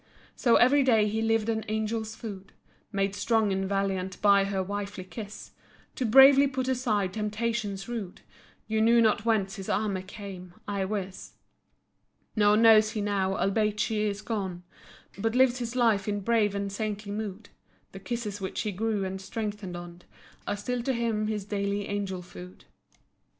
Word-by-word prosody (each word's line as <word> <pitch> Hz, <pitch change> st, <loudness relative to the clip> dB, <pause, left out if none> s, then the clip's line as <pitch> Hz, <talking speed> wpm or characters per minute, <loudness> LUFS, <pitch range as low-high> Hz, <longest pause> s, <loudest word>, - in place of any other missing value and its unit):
So 235 Hz, -3 st, +3 dB
every 280 Hz, +4 st, +5 dB
day 225 Hz, -5 st, +4 dB
he 220 Hz, +2 st, -1 dB
lived 225 Hz, -1 st, +1 dB
on 220 Hz, -1 st, 0 dB
angel's 220 Hz, +1 st, -2 dB
food; 200 Hz, -4 st, -8 dB, 0.4 s
Made 195 Hz, -1 st, 0 dB
strong 215 Hz, 0 st, +1 dB
and 190 Hz, 0 st, -2 dB
valiant 190 Hz, -2 st, -1 dB
by 200 Hz, -1 st, +5 dB
her 195 Hz, -1 st, -1 dB
wifely 200 Hz, 0 st, -5 dB
kiss; 205 Hz, +2 st, -9 dB, 0.4 s
To 250 Hz, -, -2 dB
bravely 270 Hz, +4 st, +8 dB
put 260 Hz, -1 st, -3 dB
aside 220 Hz, -8 st, 0 dB
temptations 210 Hz, -1 st, -2 dB
rude, 225 Hz, -7 st, -6 dB, 0.5 s
Yet 220 Hz, 0 st, 0 dB
knew 230 Hz, +1 st, +5 dB
not 220 Hz, -2 st, +3 dB
whence 205 Hz, -4 st, +1 dB
his 195 Hz, -, -7 dB
armor 200 Hz, -3 st, 0 dB
came, 185 Hz, -2 st, -9 dB
I 200 Hz, -2 st, -1 dB
wis, 195 Hz, -2 st, -5 dB, 1.0 s
Nor 210 Hz, -1 st, +4 dB
knows 220 Hz, -1 st, +6 dB
he 215 Hz, -, -2 dB
now, 195 Hz, -2 st, 0 dB
albeit 210 Hz, +2 st, 0 dB
she 215 Hz, 0 st, 0 dB
is 210 Hz, -1 st, -2 dB
gone, 190 Hz, -6 st, -3 dB, 0.6 s
But 225 Hz, +3 st, 0 dB
lives 255 Hz, -1 st, +4 dB
his 240 Hz, 0 st, -4 dB
life 225 Hz, -5 st, +2 dB
in 205 Hz, -1 st, -1 dB
brave 210 Hz, -1 st, +2 dB
and 200 Hz, 0 st, -2 dB
saintly 210 Hz, 0 st, -4 dB
mood— 205 Hz, -1 st, -5 dB, 0.4 s
The 195 Hz, -, -9 dB
kisses 210 Hz, 0 st, -4 dB
which 190 Hz, -, -3 dB
he 215 Hz, -, -2 dB
grew 210 Hz, 0 st, -1 dB
and 190 Hz, 0 st, -5 dB
strengthened 205 Hz, -3 st, -5 dB
on, 175 Hz, 0 st, -10 dB, 0.5 s
Are 205 Hz, -, -1 dB
still 245 Hz, +4 st, -2 dB
to 265 Hz, +3 st, -1 dB
him 225 Hz, -3 st, -1 dB
his 210 Hz, -2 st, -3 dB
daily 200 Hz, 0 st, -2 dB
angel 195 Hz, -3 st, -3 dB
food. 180 Hz, +1 st, -12 dB
210 Hz, 165 wpm, -28 LUFS, 195-225 Hz, 1.0 s, bravely